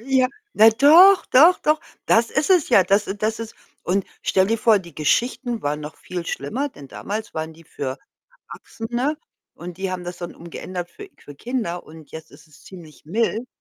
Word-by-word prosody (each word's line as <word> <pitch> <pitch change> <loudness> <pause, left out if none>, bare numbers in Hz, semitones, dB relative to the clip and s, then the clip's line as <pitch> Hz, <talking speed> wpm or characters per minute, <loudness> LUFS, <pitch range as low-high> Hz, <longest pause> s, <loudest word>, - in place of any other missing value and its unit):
Ja. 260 -1 +2 0.3
Na, 220 +1 +7
doch, 335 - +6
doch, 325 +8 +6
doch, 305 +1 +1 0.3
das 225 0 +3
ist 300 +6 -1
es 360 -5 +4
ja. 200 -6 +6
Das 200 +3 +2
das 215 +2 -1
ist 225 -1 -7 0.3
und 190 +1 -1 0.2
stell 190 0 +2
dir 225 - +1
vor, 215 -1 +4
die 170 -4 -13
Geschichten 235 - -1
waren 150 +1 -2
noch 150 +1 -9
viel 180 -2 -6
schlimmer, 240 - -3
denn 145 - -14
damals 215 +9 -6
waren 160 0 -4
die 165 +1 -18
für 135 -3 -6 0.5
Erwachsene, 240 +6 -4 0.4
und 175 0 -9
die 190 -1 -3
haben 180 -1 -5
das 175 0 -7
dann 175 -1 -7
umgeändert 175 +1 -7
für 405 - -12
für 145 - -13
Kinder, 220 - -4
und 155 -2 -15
jetzt 160 0 -10
ist - - -18
es 150 - -20
ziemlich 170 -5 -14
mild. 225 +7 -1
200 Hz, 190 wpm, -22 LUFS, 170-245 Hz, 0.5 s, Na